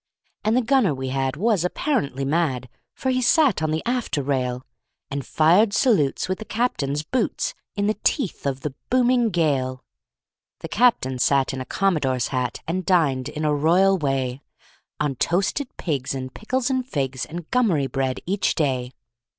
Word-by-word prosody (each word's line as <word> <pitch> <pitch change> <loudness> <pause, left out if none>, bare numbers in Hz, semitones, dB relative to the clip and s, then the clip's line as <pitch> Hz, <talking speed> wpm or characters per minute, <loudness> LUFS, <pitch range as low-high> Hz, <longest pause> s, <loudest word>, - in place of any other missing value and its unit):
And 220 +3 +2
the 255 - +2
gunner 235 - +3
we 130 0 -4
had 135 0 -1
was 205 -1 +2
apparently 180 - -1
mad, 135 -4 0 0.3
For 260 - -1
he 255 0 +1
sat 255 - +3
on 155 - 0
the 155 +1 -1
after 240 - -1
rail, 130 -2 -1 0.5
And 140 0 -3
fired 175 - +3
salutes 200 - +2
with 185 0 -2
the - - -5
captain's 150 - -1
boots, 245 +7 -1 0.2
In 200 -1 0
the 215 0 0
teeth 215 - 0
of 135 -1 -2
the 145 -2 -4 0.2
booming 250 -2 +3
gale. 140 -8 0 0.8
The - - -6
captain 205 - +2
sat 135 +1 +2
in 130 - -4
a - - -5
commodore's 145 -11 0
hat 125 -3 -2
And 185 +3 -1
dined, 150 -8 +2
in 155 +1 -4
a 150 - +2
royal 175 +6 +4
way, 135 -5 -1 0.6
On 150 -2 0
toasted 195 - 0
pigs 140 -5 -2
and 130 -1 -5
pickles 255 +4 -1
and 260 -1 0
figs 135 - -3
And 170 +1 -7
gummery 200 - +2
bread, 135 -1 -2
each 195 +3 0
day. 130 -5 -1
155 Hz, 165 wpm, -23 LUFS, 135-215 Hz, 0.8 s, royal